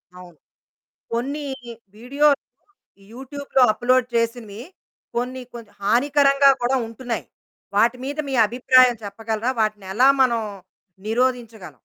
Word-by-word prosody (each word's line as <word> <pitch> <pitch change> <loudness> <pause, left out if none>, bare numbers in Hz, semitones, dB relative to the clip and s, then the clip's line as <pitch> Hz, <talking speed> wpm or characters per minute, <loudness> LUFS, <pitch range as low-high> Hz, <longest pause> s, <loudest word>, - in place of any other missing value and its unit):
అవును. 180 -2 -13 0.8
కొన్ని 280 +5 -3 0.5
వీడియోలు 280 +5 +2 0.7
యూట్యూబ్‌లో 270 +1 -2
అప్‌లోడ్ 250 +1 +1
చేసినవి 230 -2 -2 0.5
కొన్ని 255 +2 -3
కొన్ని 230 -3 -11
హానికరంగా 275 +5 +3
కూడా 245 +2 +1
ఉంటున్నాయి. 230 -2 -5 0.5
వాటి 235 +4 +3
మీద 285 +2 -5
మీ - - -4
అభిప్రాయం 255 +1 +4
చెప్పగలరా? 220 +4 -3
వాటిని 210 -3 -2
ఎలా 255 +5 +5
మనం 235 -3 +2 0.7
నిరోధించగలం? 235 -4 -2
245 Hz, 100 wpm, -22 LUFS, 225-265 Hz, 0.8 s, ఎలా